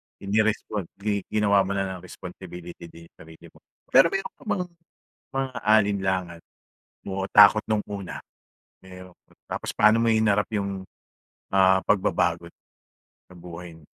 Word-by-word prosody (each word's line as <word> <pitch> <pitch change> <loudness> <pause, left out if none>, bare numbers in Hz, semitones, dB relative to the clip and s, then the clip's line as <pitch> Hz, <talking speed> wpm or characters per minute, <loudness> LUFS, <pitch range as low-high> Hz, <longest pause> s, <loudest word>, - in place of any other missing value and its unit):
Hindi 100 +2 -1
responli 105 -2 -2
ginawa 105 -2 +2
mo 100 - -2
na 100 - 0
lang 95 -1 -5
responsibility 90 -1 -10
din 85 0 -14
iyong 85 - -21
sarili 80 0 -14
mo. - - -21 0.3
Pero 135 +5 +7
mayroon 195 +3 -4
ka - - -16
bang 190 -3 0 0.7
mga 135 -1 -1 0.2
alinlangan 95 -5 +1 0.7
o 95 0 -3
takot 105 +1 +7
noong 110 -2 -1
una? 100 -3 -6 0.6
Pero 90 -1 -13 0.3
tapos - - -4
paano 110 +2 +4
mo 115 - +3
hinarap 110 -2 +3
iyong, 100 -2 -3 0.7
ah, 95 -1 +4
pagbabago 85 -4 +1 0.9
sa - - -14
buhay? 85 -1 -10
95 Hz, 135 wpm, -25 LUFS, 90-105 Hz, 0.9 s, Pero